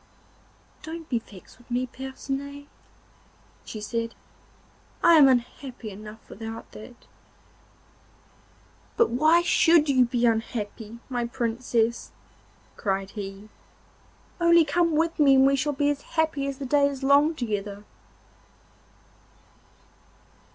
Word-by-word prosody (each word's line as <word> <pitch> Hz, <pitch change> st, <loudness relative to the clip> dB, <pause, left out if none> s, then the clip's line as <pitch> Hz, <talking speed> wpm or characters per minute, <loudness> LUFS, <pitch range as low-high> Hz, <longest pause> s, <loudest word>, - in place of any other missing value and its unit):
'Don't 325 Hz, 0 st, -8 dB
be 240 Hz, -, 0 dB
vexed 200 Hz, -1 st, -16 dB
with 245 Hz, -, -22 dB
me, 250 Hz, +1 st, 0 dB
Percinet,' 270 Hz, +2 st, -6 dB, 1.0 s
she 215 Hz, -, -8 dB
said. 230 Hz, +2 st, -4 dB, 0.9 s
'I 340 Hz, -, +7 dB
am 300 Hz, -4 st, +8 dB
unhappy 250 Hz, -2 st, -2 dB
enough 210 Hz, +2 st, -11 dB
without 225 Hz, +1 st, -8 dB
that.' 240 Hz, +3 st, -13 dB, 1.9 s
'But 465 Hz, -, +3 dB
why 315 Hz, +8 st, +4 dB
should 330 Hz, -3 st, +4 dB
you 255 Hz, -2 st, +4 dB
be 240 Hz, 0 st, 0 dB
unhappy, 225 Hz, -1 st, -2 dB
my 245 Hz, -2 st, -2 dB
Princess?' 235 Hz, -1 st, -1 dB, 0.7 s
cried 195 Hz, -1 st, -2 dB
he. 200 Hz, 0 st, -8 dB, 0.9 s
'Only 340 Hz, -1 st, +5 dB
come 335 Hz, +2 st, +1 dB
with 330 Hz, +1 st, 0 dB
me 280 Hz, -2 st, +6 dB
and 265 Hz, 0 st, +6 dB
we 275 Hz, 0 st, +4 dB
shall 295 Hz, +2 st, 0 dB
be 290 Hz, +1 st, +1 dB
as 285 Hz, -1 st, -4 dB
happy 315 Hz, -4 st, -1 dB
as 275 Hz, -1 st, -4 dB
the 275 Hz, -, -6 dB
day 280 Hz, +2 st, +3 dB
is 275 Hz, -1 st, -6 dB
long 285 Hz, +4 st, +4 dB
together. 205 Hz, -5 st, -4 dB
260 Hz, 115 wpm, -25 LUFS, 225-290 Hz, 1.9 s, am